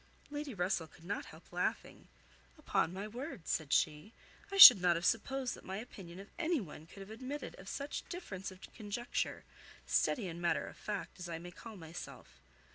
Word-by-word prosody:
Lady 295 -1 -4
Russell 180 -2 0
could 160 - -19
not 200 +4 -3
help 160 +2 -15
laughing. 180 - -3 0.5
"Upon 165 - 0
my 195 +3 -5
word," 240 - -7
said 155 -4 -1
she, 155 +10 +1 0.4
"I 395 - -2
should 250 - +13
not 175 -1 +4
have 170 +1 -2
supposed 265 +4 0
that - - -11
my 190 +1 -5
opinion 195 -6 -9
of 200 - -11
any 340 -2 +1
one 160 -5 -9
could 195 - -12
have 195 +2 -10
admitted 265 +6 -6
of 190 +1 -9
such 285 +1 -5
difference 205 - -6
of 185 0 -14
conjecture, 220 +2 -3 0.4
steady 225 -9 +1
and 170 0 -6
matter 170 - +1
of - - -10
fact 205 -2 -5
as 180 -1 -6
I 165 - -3
may 175 +2 -9
call 220 +4 -11
myself. 165 0 -10
195 Hz, 190 wpm, -34 LUFS, 175-245 Hz, 0.5 s, should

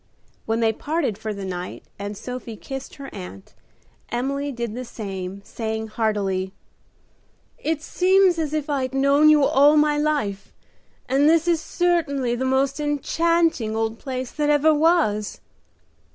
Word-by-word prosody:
When 225 +1 0
they 225 -1 +3
parted 295 -2 -1
for 220 - -4
the 200 -2 -5
night 180 -1 -6 0.2
and 205 0 -5
Sophie 250 -1 -6
kissed 270 +4 -7
her 275 -1 -9
aunt, 95 +2 -9 0.6
Emily 275 +4 -2
did 235 -4 -4
the 250 +2 -5
same, 195 -4 -6
saying 220 -1 -4
heartily, 200 -4 -1 1.1
"It 310 -1 -2
seems 370 -1 +3
as 310 -3 -1
if 305 -1 -2
I'd 270 -3 -1
known 280 +3 +5
you 300 -2 +6
all 285 +3 +5
my 300 0 +3
life, 285 -11 -1 0.6
and 275 +4 +4
this 330 +1 +3
is 335 -2 +2
certainly 315 -8 0
the 250 +2 -2
most 270 +2 +1
enchanting 300 -4 +1
old 225 0 -2
place 255 -2 -4
that 295 -1 -1
ever 295 +1 +4
was." 295 -10 +2
270 Hz, 145 wpm, -23 LUFS, 220-300 Hz, 1.1 s, you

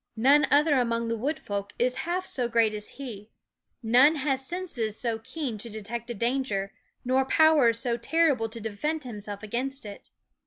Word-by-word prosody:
None 280 +6 +5
'$5 - - -10
other 295 +1 +4
among 235 -1 0
the 230 - 0
wood 280 +8 -2
folk 200 -4 -5
is 250 +1 +2 0.2
half 365 +2 -1
so 250 -8 -1
great 230 -2 +2
as 210 0 -7
he; 220 -6 -8 0.5
none 255 +7 +6
has 270 -2 -1
senses 265 - -3
so 230 -2 -1
keen 245 -1 -5
to 235 - -5
detect 230 +2 -6
a 240 - -4
danger, 230 -4 -1 0.3
nor 260 +1 +3
powers 285 -5 +4
so 235 0 -1
terrible 265 -3 +2
to 230 +1 -6
defend 285 +9 -3
himself 210 -4 -6
against 255 +5 -3
it. 205 -1 -10
240 Hz, 180 wpm, -27 LUFS, 220-280 Hz, 0.5 s, none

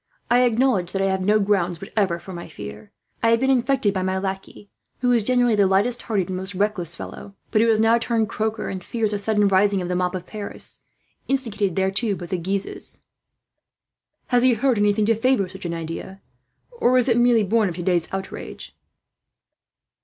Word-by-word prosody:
I 245 +1 +5
acknowledge 235 -7 +1
that 195 - -1
I 195 - +2
have 190 0 -1
no 210 +3 +3
grounds 185 -4 0
whatever 195 -3 -1
for 185 +3 -10
my 170 0 -7
fear. 105 +10 -10 0.3
I 230 - +3
have 230 0 +4
been 265 +2 +2
infected 255 -4 +2
by 190 - -1
my 185 0 -1
lackey, 195 +1 -5 0.3
who 250 -1 +2
is 235 -2 +4
generally 245 +1 +2
the 205 -2 +4
lightest 205 +6 +1
hearted 200 -6 -1
and 185 - -3
most 190 +1 -4
reckless 180 -4 0
fellow; 200 +3 -9 0.2
but 215 - +3
who 230 - +3
has 220 -1 +3
now 225 +1 +4
turned 230 -1 0
croaker, 220 0 -2
and 185 -2 -5
fears 220 0 -1
a 205 - -1
sudden 210 0 +2
rising 195 +1 +3
of 180 -1 -4
the 180 - -1
mob 180 0 0
of 180 -1 -5
Paris, 210 0 -4 0.5
instigated 225 -9 -1
thereto 195 +3 +1
by 180 - -7
the 180 +1 -3
Guises." 195 +3 -3 1.2
"Has 245 -1 +3
he 250 -1 +4
heard 245 -1 +1
anything 205 0 +2
to 225 - +4
favour 225 -3 +1
such 190 0 -10
an 170 - -2
idea, 165 +4 -7 0.5
or 255 - +2
is 250 - +2
it 235 - +3
merely 240 -2 +4
born 215 0 +2
of 170 - -6
today's 175 -1 0
outrage?" 190 0 -7
205 Hz, 200 wpm, -23 LUFS, 190-230 Hz, 1.2 s, I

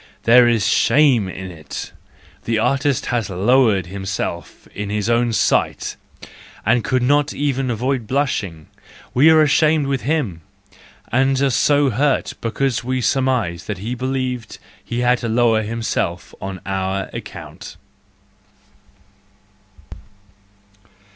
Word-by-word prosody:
There 120 +1 +6
is 115 -4 +2
shame 130 -10 +3
in 95 0 -7
it, 80 -4 -8 0.5
the 115 -1 0
artist 135 +3 +1
has 115 -4 -1
lowered 105 0 +2
himself 95 -3 -5
in 105 0 -5
his 105 +2 -1
own 120 0 +2
sight, 110 - 0 0.7
and 120 -2 +2
could 130 +4 0
not 145 +3 +2
even 135 -2 -1
avoid 120 0 -2
blushing: 105 - -2 0.5
we 145 +6 +5
are 160 -1 +6
ashamed 150 0 +3
with 135 -1 -1
him, 130 - -1 0.7
and 135 +2 +2
are 135 -1 +2
so 145 +2 +3
hurt 140 +5 0
because 120 +2 -1
we 130 +1 -1
surmise 125 -9 0
that 105 - -4
he 110 +6 -4
believed 130 -2 -3 0.3
he 120 +1 -3
had 125 0 +2
to 115 - -3
lower 115 -1 +2
him¬ 115 +2 -4
self 85 -5 -2
on 95 -1 -6
our 95 0 -2
account. - - -9
120 Hz, 125 wpm, -20 LUFS, 100-135 Hz, 0.7 s, There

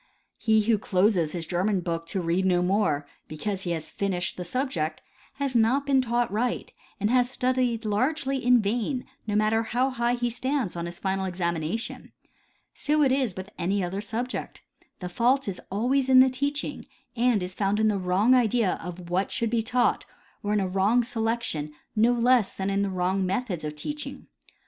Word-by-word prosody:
He 220 -2 +3
who 220 -1 +2
closes 185 -5 +2
his 170 -2 -3
German 185 +3 0
book 165 -1 -3
to 185 +3 -2
read 170 +3 +1
no 180 -1 +2
more 180 -7 +1 0.2
because 190 +5 -4
he - - -2
has 160 -1 -5
finished 185 -3 -2
the 180 - -5
subject 175 - -2 0.3
has 275 -2 -3
not 240 +5 +3
been 275 -2 +3
taught 240 -2 0
right 235 +4 -1 0.3
and 210 +2 +1
has 250 -1 +3
studied 250 -3 0
largely 265 +5 0
in 245 -2 +5
vain, 240 +5 -1 0.2
no 205 - -1
matter 215 +1 +3
how 245 +4 0
high 240 -1 0
he 240 0 -1
stands 255 -4 -1
on 170 0 -3
his 175 0 -7
final 190 0 -1
examination. 175 +2 -3 0.6
So 300 0 +1
is 260 -5 +2
it - - -20
with 190 +2 -7
any 195 +3 0
other 190 +3 -3
subject. 230 +4 -4 0.4
The 180 - -3
fault 245 +8 +1
is 190 -2 -4
always 255 +6 +1
in 260 -1 +8
the 260 0 +6
teaching, 285 +3 -3 0.3
and 235 -4 +2
is 180 0 -5
found 200 +1 0
in 220 - +3
the 205 -2 +1
wrong 190 +7 +3
idea 235 -5 +2
of 175 0 -8
what 185 +2 +1
should 230 -2 -1
be 235 -1 +2
taught 245 +2 +1 0.4
or 205 - -2
in 210 - +2
a 190 - 0
wrong 195 +6 +2
selection 225 -10 -2 0.2
no 225 +3 +4
less 240 -2 +3
than 195 +1 -1
in 200 0 +1
the 200 - 0
wrong 185 +1 0
methods 185 -2 -2
of 150 0 -4
teaching. 295 - -6
215 Hz, 185 wpm, -26 LUFS, 185-245 Hz, 0.6 s, in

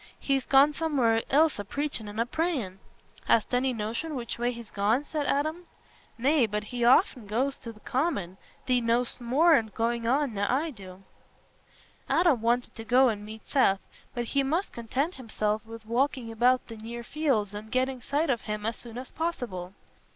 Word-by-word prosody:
He's 270 -2 0
gone 280 +2 +6
somewhere 265 -9 +2
else 305 -3 +3
a - - -2
preachin' 280 0 -3
and 205 +2 -6
a 230 - +2
prayin'." 255 - -2 0.5
"Hast 230 +2 +2
any 255 +1 +2
notion 235 +8 -3
which 235 -2 -5
way 240 +1 +1
he's 235 -2 -9
gone?" 215 +7 +1
said 295 -1 -3
Adam. 310 +5 -1 0.5
"Nay, 265 +1 +3
but 210 0 -2
he 240 +3 -4
aften 250 - +4
goes 260 +6 0
to 230 - -7
th' 215 -1 -19
Common. 250 - -1 0.3
Thee 250 -1 +2
know'st 235 +2 0
more 290 +8 +4
o's 225 -6 +3
goings 230 +2 -1
nor 235 -5 +1
I 300 +5 0
do." 190 -5 -12 1.1
Adam 330 -9 +3
wanted 240 +2 +1
to 225 - -6
go 250 +3 +5
and 210 -2 -3
meet 215 +1 -9
Seth, 195 -9 +3 0.4
but 240 -1 -2
he 275 +4 +1
must 320 +8 -1
content 260 +8 -2
himself 215 -3 -1
with 225 -1 -10
walking 250 0 0
about 245 +3 +3
the 225 - -9
near 235 +2 -7
fields 235 -8 0
and 215 +1 -8
getting 255 0 0
sight 290 +4 0
of 235 - -1
him 210 0 -4
as 225 +1 -1
soon 235 -1 -10
as 255 +1 -7
possible. 200 - -4
240 Hz, 180 wpm, -28 LUFS, 220-275 Hz, 1.1 s, gone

